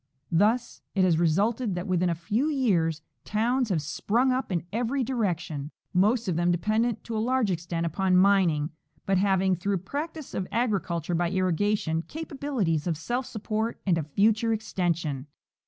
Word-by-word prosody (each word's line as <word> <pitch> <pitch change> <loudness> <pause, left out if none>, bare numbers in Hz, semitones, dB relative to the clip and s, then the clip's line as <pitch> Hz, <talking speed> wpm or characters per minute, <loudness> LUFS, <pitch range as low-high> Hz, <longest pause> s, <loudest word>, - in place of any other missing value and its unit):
Thus 220 +8 +2
it 190 - +3
has 170 -3 +3
resulted 200 +6 +1
that 175 +1 -3
within 180 -2 +1
a 170 - 0
few 210 - 0
years 170 - +1 0.2
towns 240 +3 0
have 165 -6 0
sp,rung 235 - +1
up 255 -4 -1
in 170 -2 -1
every 245 +4 0
direction, 175 - -2 0.2
most 215 +5 +3
of 180 - 0
them 175 +1 +2
dependent 215 +6 +1
to 230 - -5
a - - 0
large 245 -3 +1
extent 170 -1 -2
upon 185 +3 +2
mining, 180 -6 +3 0.3
but 195 -1 +2
having, 190 -1 +3
through 195 +3 -1
practice 295 - -5
of 190 - -2
agri 230 -4 +1
culture 170 0 -3
by 170 0 +1
irrigation, 185 -2 +1
capabilities 265 - -2
of 165 -3 0
self 240 - -2
support 220 +1 -3
and 185 -3 +3
of 155 - -4
future 220 +3 +3
extension. 170 -10 -2
195 Hz, 165 wpm, -27 LUFS, 170-230 Hz, 0.3 s, it